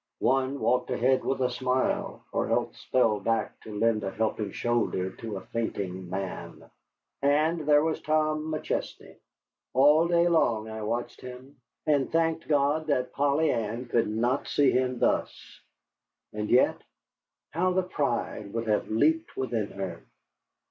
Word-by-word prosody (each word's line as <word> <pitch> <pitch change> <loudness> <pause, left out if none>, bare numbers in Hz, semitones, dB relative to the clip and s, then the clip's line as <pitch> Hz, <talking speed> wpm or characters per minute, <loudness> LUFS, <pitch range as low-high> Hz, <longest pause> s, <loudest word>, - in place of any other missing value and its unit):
One 135 +2 +1
walked 125 +3 +1
ahead 130 +2 +2
with 135 0 -1
a 125 -1 +1
smile, 130 +1 -1
or - - -1
else - - -1
fell 115 -5 +2
back 115 +3 -1
to 105 -1 -8
lend 110 -1 +2
a 95 - -1
helping 110 0 -2
shoulder 115 -6 -1
to 110 -3 -5
a - - -7
fainting 95 -5 -4
man. 95 +1 -6 0.5
And 155 +4 +2
there 145 0 +6
was 160 -1 -1
Tom 155 0 0
McChesney. 155 - -4 0.6
All 150 +5 +5
day 170 0 +3
long 115 -10 +2
I 110 0 -6
watched 115 +3 -3
him, 130 +3 -10 0.3
and 145 -3 +2
thanked 165 0 0
God 150 +1 +2
that 125 -4 0
Polly 145 +3 +2
Ann 115 +3 -2
could 115 -2 +2
not 120 +5 0
see 140 -2 +3
him 130 0 0
thus. - - -1 0.7
And 105 0 -3
yet, 125 - +3 0.7
how 180 +3 +1
the 185 +1 +2
pride 120 - -2
would 115 0 -2
have 105 -1 0
leaped 155 +9 +1
within 115 -5 -1
her! 95 -4 -6
125 Hz, 150 wpm, -27 LUFS, 110-150 Hz, 0.7 s, there